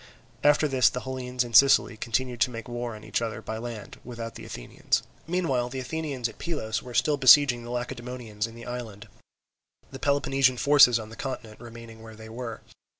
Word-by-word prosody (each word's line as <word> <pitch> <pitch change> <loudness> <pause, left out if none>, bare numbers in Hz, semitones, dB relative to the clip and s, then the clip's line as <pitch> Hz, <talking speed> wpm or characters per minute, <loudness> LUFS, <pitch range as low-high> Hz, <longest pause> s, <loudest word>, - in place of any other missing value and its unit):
After 150 +1 +4
this 130 -4 +4
the 125 - -5
Hellenes 125 -1 -3
in 120 -1 -9
Sicily 135 -1 +6
continued 120 +2 -2
to 125 - +4
make 115 -2 -8
war 120 -1 -4
on 105 - -12
each - - -2
other 110 -2 -3
by 110 0 -6
land, 115 -3 -8
without 115 -2 -7
the - - -10
Athenians. - - -2 0.2
Meanwhile 140 -9 0
the 130 - -6
Athenians 135 -2 -3
at 115 - -13
Pylos 145 -10 -3
were 125 -1 -10
still 150 -1 +2
besieging 130 -2 +6
the 120 - -9
Lacedaemonians 120 -3 -4
in 115 - -12
the 115 - -10
island, 115 -3 -7 0.8
the 135 - -8
Peloponnesian 135 -2 +2
forces 140 -3 +6
on 110 -1 -7
the 115 - -11
continent 120 -5 -6
remaining 115 -1 -11
where 110 0 -11
they 110 0 -11
were. 115 0 -6
120 Hz, 190 wpm, -26 LUFS, 115-130 Hz, 0.8 s, Sicily